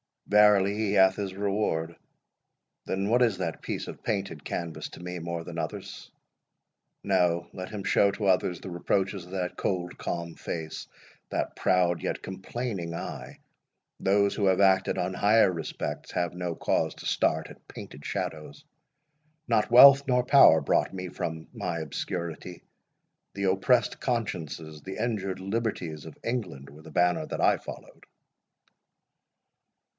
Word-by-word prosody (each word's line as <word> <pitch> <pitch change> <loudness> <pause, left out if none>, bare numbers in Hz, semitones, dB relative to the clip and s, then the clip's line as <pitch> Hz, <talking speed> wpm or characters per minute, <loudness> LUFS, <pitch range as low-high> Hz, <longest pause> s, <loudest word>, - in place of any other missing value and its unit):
Verily 105 -1 +5
he 105 -2 0
hath 95 -1 +5
his 95 -2 -4
reward: 95 -5 -1 0.9
Then, 95 +2 -1
what 120 +2 +3
is 115 -6 +3
that 85 -3 -3
piece - - -4
of - - -9
painted - - -3
canvas 85 -2 -4
to - - -11
me 90 0 -5
more 85 0 -4
than 85 0 -6
others? 80 -1 -6 0.9
No; 85 -1 +1
let 95 -1 -6
him 105 -2 -6
show 100 - +4
to 100 +1 -4
others 90 -2 +2
the - - -7
reproaches 95 +1 -1
of 90 - -15
that 90 -2 -3
cold, 90 -2 -2
calm 85 -1 -4
face, 80 -2 -6 0.4
that - - -2
proud 90 -2 +2
yet - - -3
complaining 95 -2 -4
eye: - - -7 0.6
Those 100 +1 +2
who 100 - 0
have 95 0 +3
acted 95 -1 +3
on 90 +1 -1
higher 105 0 +4
respects 80 -3 -5
have 85 -1 -1
no 90 -1 -3
cause - - 0
to - - -11
start - - +1
at - - -15
painted 70 - -10
shadows. 80 - -5 0.9
Not 105 - +2
wealth 140 +3 +9
nor 125 -1 +3
power 125 - +7
brought 70 - +1
me 90 -1 -5
from 80 -2 -5
my 90 -7 -3
obscurity. 85 +2 -5 0.7
The 100 - -4
oppressed 100 +5 +2
consciences, 80 - -3
the 95 +5 -7
injured 105 -5 -2
liberties 95 -7 -3
of 80 - -11
England, 95 - -4
were 75 +2 -14
the 80 - -12
banner 90 +3 +1
that - - -4
I - - +4
followed." - - -11
95 Hz, 150 wpm, -28 LUFS, 85-100 Hz, 0.9 s, wealth